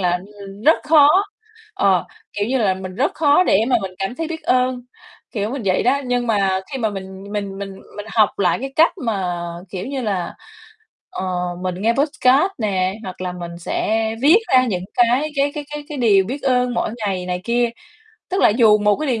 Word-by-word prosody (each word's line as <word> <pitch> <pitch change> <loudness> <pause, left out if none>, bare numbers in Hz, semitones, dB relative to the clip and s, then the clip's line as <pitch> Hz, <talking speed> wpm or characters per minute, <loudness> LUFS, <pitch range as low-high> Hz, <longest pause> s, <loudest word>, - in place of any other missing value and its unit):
là, 180 -1 +1 0.3
ừm, 195 +2 -11
rất 315 +4 +5
khó, 300 -2 +6 0.7
ờ, 190 -3 +2 0.3
kiểu 205 0 -2
như 265 - +1
là, 200 -5 +2
mình 185 0 -7
rất 270 +9 0
khó 300 +2 +4
để 195 - +3
mà 250 - +4
mình 190 -1 -5
cảm 195 +5 -3
thấy 325 +2 -4
biết 320 -1 -6
ơn, 255 -2 +1 0.5
kiểu 210 -1 -2
mình 265 -2 -4
vậy 185 -1 +2
đó. 275 +3 +2
Nhưng 245 -1 0
mà 195 -4 +1
khi 270 - -3
mà 220 -3 0
mình 190 -1 -8
mình 200 -2 -4
mình 195 -1 -6 0.2
mình 205 +1 -7
học 215 -3 +4
lại 180 -4 +2
cái 270 +1 -5
cách 325 +2 +5
mà, 190 -6 -1 0.4
kiểu 185 -1 -5
như 270 0 -3
là, 195 -6 -2 0.8
ờ, - - -5 0.4
mình 185 -1 -2
nghe 230 +2 +3
podcast 285 +4 +2
nè, 190 -4 0
hoặc 185 -1 -8
là 180 -1 -3
mình 170 -1 -7
sẽ 220 +5 -1 0.2
viết 315 +9 +7
ra 255 -1 +6
những 185 -5 -2
cái 245 +5 +2
cái 280 +1 +1
cái 295 - -5
cái 295 0 -6
cái 295 -3 -6
điều 205 -5 +4
biết 265 +8 -5
ơn 250 -2 +1
mỗi 225 - -1 0.2
ngày 185 -2 -2
này 180 0 -2
kia, 240 0 +1 0.6
tức 375 - 0
là - - +7
dù 215 -1 +5
một 210 -1 +2
cái 305 - -3
điều 235 -4 0
220 Hz, 210 wpm, -20 LUFS, 190-265 Hz, 0.8 s, viết